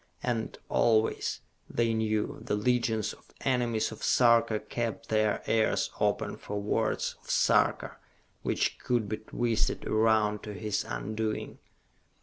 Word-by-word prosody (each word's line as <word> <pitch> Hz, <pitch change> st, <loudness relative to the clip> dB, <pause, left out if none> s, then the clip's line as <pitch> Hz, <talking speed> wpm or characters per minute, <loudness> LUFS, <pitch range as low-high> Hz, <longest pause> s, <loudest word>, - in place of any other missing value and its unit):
And 120 Hz, -3 st, -2 dB
always, 110 Hz, -1 st, +2 dB, 0.3 s
they 115 Hz, -1 st, +1 dB
knew, 110 Hz, -1 st, -1 dB
the -, -, -1 dB
legions 115 Hz, -1 st, +1 dB
of -, -, -19 dB
enemies 120 Hz, -4 st, +1 dB
of 110 Hz, -, -10 dB
Sarka 115 Hz, -3 st, +4 dB
kept 115 Hz, +1 st, -4 dB
their 110 Hz, -1 st, +1 dB
ears 110 Hz, -1 st, +2 dB
open -, -, 0 dB
for 105 Hz, 0 st, -5 dB
words 100 Hz, -, -1 dB
of -, -, -18 dB
Sarka -, -, +2 dB, 0.4 s
which -, -, 0 dB
could 120 Hz, -4 st, 0 dB
be 110 Hz, +1 st, -2 dB
twisted 115 Hz, 0 st, -1 dB
around 110 Hz, -1 st, +2 dB
to 105 Hz, -1 st, -7 dB
his 105 Hz, +2 st, -1 dB
undoing. 110 Hz, +1 st, -3 dB
110 Hz, 130 wpm, -29 LUFS, 105-115 Hz, 0.4 s, Sarka